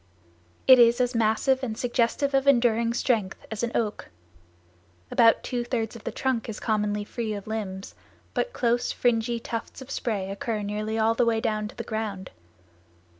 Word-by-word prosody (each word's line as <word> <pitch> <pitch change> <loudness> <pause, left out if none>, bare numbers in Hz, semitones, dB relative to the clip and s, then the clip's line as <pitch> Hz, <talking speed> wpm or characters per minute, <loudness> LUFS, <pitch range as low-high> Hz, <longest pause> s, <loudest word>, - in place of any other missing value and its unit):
It 260 -1 +8
is 235 0 +6
as 250 0 +1
massive 230 +4 +2
and 225 -4 -4
suggestive 245 +3 0
of 270 0 +2
enduring 235 -3 +4
strength 220 -7 -1
as 220 - -3
an 235 0 -1
oak. 215 -3 -2 1.0
About 230 -1 +5
two 245 -2 -2
thirds 235 -2 -2
of 230 - -12
the - - -2
trunk 255 -4 -1
is 215 - -5
commonly 210 -2 0
free 220 0 -4
of 200 - -7
limbs, 200 -3 -5 0.4
but - - -1
close, 240 - 0
fringy 235 -1 +1
tufts 230 0 -6
of 265 0 -10
spray 200 -5 -2
occur 210 +1 -3
nearly 210 +2 -3
all 225 0 +3
the 230 - +2
way 230 -1 +2
down 215 -1 -1
to - - -12
the - - -5
ground. 210 -4 -4
230 Hz, 175 wpm, -26 LUFS, 215-240 Hz, 1.0 s, It